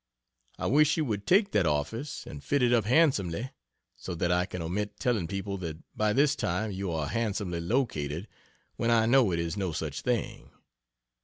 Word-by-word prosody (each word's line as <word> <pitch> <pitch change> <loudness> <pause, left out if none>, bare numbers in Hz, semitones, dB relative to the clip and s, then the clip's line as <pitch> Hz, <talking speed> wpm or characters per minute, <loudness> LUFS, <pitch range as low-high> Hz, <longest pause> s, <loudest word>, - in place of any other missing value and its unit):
I - - -4
wish 150 +5 +4
you 155 - +1
would 105 -4 -3
take 200 +2 +4
that 100 -5 +2
office, 95 - -2
and 70 - -9
fit 145 -3 +1
it 120 0 +4
up 115 -4 +3
handsomely, 120 - +2 0.4
so 90 - -6
that 85 +1 0
I 90 +1 +2
can 90 - -6
omit 95 +5 -3
telling 110 -9 0
people 100 +1 -4
that 80 -3 -5 0.2
by 110 0 +1
this 140 +5 +3
time 110 -6 -1
you 95 -1 -3
are 80 -2 -1
handsomely 100 -1 -2
located, 85 - -1 0.5
when 115 - 0
I 115 -1 +4
know 120 -3 +4
it 85 - 0
is 85 0 -2
no 95 -3 -1
such 75 -2 -4
thing. 120 -3 -2
100 Hz, 185 wpm, -29 LUFS, 85-120 Hz, 0.5 s, wish